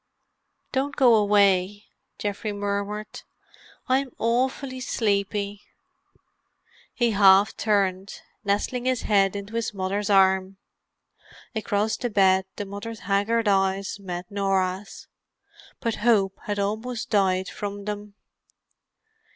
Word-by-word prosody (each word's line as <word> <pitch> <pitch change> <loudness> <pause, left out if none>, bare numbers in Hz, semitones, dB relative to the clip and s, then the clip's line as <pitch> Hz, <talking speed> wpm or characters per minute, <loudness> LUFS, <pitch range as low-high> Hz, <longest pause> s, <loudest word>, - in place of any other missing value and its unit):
"Don't 275 +1 -1
go 250 -4 +5
away," 205 -1 +3 0.3
Geoffrey 205 +1 -3
murmured. 205 +1 -4 0.7
"I'm 260 0 +1
awful 255 +3 -1
sleepy." 205 -3 -1 1.3
He 240 -2 +1
half 200 0 +5
turned, 195 -2 0 0.2
nestling 210 +5 -1
his 255 -2 0
head 195 -2 +2
into 200 +2 -7
his 230 -2 -2
mother's 200 +2 -2
arm. 190 -1 +3 1.0
Across 215 -1 -1
the 245 - -2
bed 190 -2 +3
the 205 - -4
mother's 205 +3 -7
haggard 205 +4 +1
eyes 195 0 +1
met 180 -2 -6
Norah's. 195 -1 -2 0.7
But 230 -2 -2
hope 205 -4 +3
had 205 -1 -2
almost 220 +4 -3
died 190 -3 +2
from 205 -1 -6
them. 210 -1 -6
205 Hz, 105 wpm, -25 LUFS, 195-220 Hz, 1.3 s, go